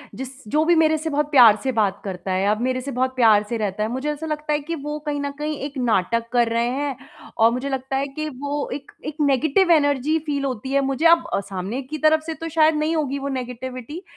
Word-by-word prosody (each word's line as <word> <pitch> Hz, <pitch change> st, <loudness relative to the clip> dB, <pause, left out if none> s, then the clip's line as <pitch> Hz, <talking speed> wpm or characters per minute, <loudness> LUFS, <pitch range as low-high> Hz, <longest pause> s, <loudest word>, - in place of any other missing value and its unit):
जिस 265 Hz, 0 st, -9 dB
जो 305 Hz, +1 st, +3 dB
भी 345 Hz, 0 st, +4 dB
मेरे 315 Hz, -1 st, +3 dB
से 320 Hz, +1 st, -4 dB
बहुत 295 Hz, 0 st, -1 dB
प्यार 235 Hz, -6 st, +8 dB
से 265 Hz, -, 0 dB
बात 210 Hz, -5 st, 0 dB
करता 190 Hz, -1 st, -5 dB
है, 190 Hz, +2 st, +1 dB
अब 215 Hz, +2 st, 0 dB
मेरे 255 Hz, 0 st, 0 dB
से 280 Hz, +2 st, -5 dB
बहुत 260 Hz, +1 st, -1 dB
प्यार 220 Hz, -4 st, +5 dB
से 235 Hz, -, -1 dB
रहता 210 Hz, -1 st, -2 dB
है, 220 Hz, -, -1 dB
मुझे 260 Hz, +4 st, -2 dB
ऐसा 300 Hz, +2 st, -6 dB
लगता 300 Hz, -1 st, -2 dB
है 295 Hz, -, +1 dB
कि 330 Hz, +3 st, -5 dB
वो 295 Hz, 0 st, -5 dB
कहीं 290 Hz, -1 st, -2 dB
न 285 Hz, 0 st, -3 dB
कहीं 300 Hz, -1 st, -2 dB
एक 285 Hz, -1 st, -7 dB
नाटक 230 Hz, -1 st, 0 dB
कर 240 Hz, -1 st, +3 dB
रहे 235 Hz, +1 st, +1 dB
हैं 275 Hz, +1 st, -2 dB, 0.4 s
और 225 Hz, +1 st, +5 dB
मुझे 255 Hz, +3 st, -3 dB
लगता 265 Hz, 0 st, -3 dB
है 280 Hz, +1 st, -1 dB
कि 310 Hz, +3 st, -5 dB
वो 285 Hz, +2 st, -4 dB
एक 275 Hz, 0 st, -8 dB
एक 300 Hz, -, -5 dB
नेगेटिव 295 Hz, +6 st, +3 dB
एनर्जी 290 Hz, 0 st, +3 dB
फील 285 Hz, -2 st, -1 dB
होती 260 Hz, 0 st, -4 dB
है 275 Hz, 0 st, +3 dB
मुझे, 275 Hz, +4 st, -1 dB
अब 335 Hz, 0 st, +6 dB
अ, -, -, +2 dB
सामने 195 Hz, +6 st, -5 dB
की 300 Hz, +4 st, -6 dB
तरफ 310 Hz, +1 st, +3 dB
से 325 Hz, -, -3 dB
तो 330 Hz, +2 st, -6 dB
शायद 315 Hz, 0 st, +3 dB
नहीं 310 Hz, +2 st, 0 dB
होगी 280 Hz, -3 st, -1 dB
वो 280 Hz, -, -4 dB
नेगेटिविटी। 255 Hz, +5 st, -7 dB
275 Hz, 250 wpm, -22 LUFS, 245-300 Hz, 0.4 s, प्यार